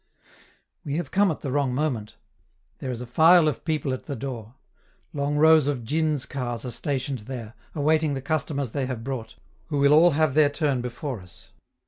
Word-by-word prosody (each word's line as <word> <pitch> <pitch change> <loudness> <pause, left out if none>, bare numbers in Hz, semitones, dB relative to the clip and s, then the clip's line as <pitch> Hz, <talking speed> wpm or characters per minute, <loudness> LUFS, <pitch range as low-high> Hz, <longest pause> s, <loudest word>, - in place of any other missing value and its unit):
We 145 - -3
have 165 -4 -3
come 200 0 +3
at 160 - -3
the 135 - -3
wrong 135 -2 0
moment; 120 -7 -2 0.6
there 130 - -5
is 125 -1 -4
a - - -5
file 160 +6 +6
of 150 - -2
people 155 -4 -1
at 130 - -6
the 140 - -4
door. 120 -2 -6 0.6
Long 145 0 -1
rows 160 -1 +6
of 135 -5 -1
djins' 155 0 0
cars 120 -3 -4
are 125 - -4
stationed 135 +2 -2
there, 120 -4 -6 0.2
awaiting 155 0 +2
the - - -3
customers 145 -4 -2
they 135 0 -2
have 125 -4 -5
brought, 120 -4 -5 0.3
who 150 -3 -2
will 140 +1 +5
all 170 +3 +7
have 155 -3 +2
their 150 0 +5
turn 145 -3 0
before 125 -1 -5
us. 90 -1 -13
140 Hz, 190 wpm, -25 LUFS, 125-155 Hz, 0.6 s, all